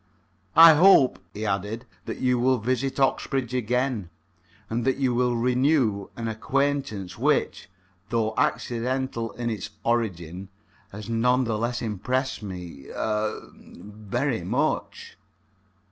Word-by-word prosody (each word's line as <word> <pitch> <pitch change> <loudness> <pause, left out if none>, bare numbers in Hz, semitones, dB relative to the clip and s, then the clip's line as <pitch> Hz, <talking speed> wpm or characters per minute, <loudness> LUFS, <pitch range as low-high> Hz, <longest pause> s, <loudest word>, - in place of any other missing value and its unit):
"I 165 0 +10
hope," 155 - +6
he 105 +1 -5
added, 105 +4 -2 0.2
"that - - -5
you 125 -1 +1
will 130 +1 +3
visit 130 +4 -1
Oxbridge 135 -2 0
again, 125 -4 -1 0.6
and 115 +2 -2
that 130 +2 +1
you 130 -3 +1
will 125 +1 +2
then 115 - -2
renew 125 -5 +2
an 115 -1 -3
acquaintance 115 -3 -2
which, - - 0 0.4
though 110 -1 0
accidental 120 0 -1
in 120 -1 -3
its 110 - -5
origin, 95 -6 -2 0.4
has 105 +1 -9
none 125 +3 +2
the 115 -3 -1
less 120 +2 -2
impressed 125 +6 -2
me 90 -8 -8
er 110 0 -3 0.3
very 110 +6 -3
much." - - -2
120 Hz, 125 wpm, -25 LUFS, 105-130 Hz, 0.6 s, I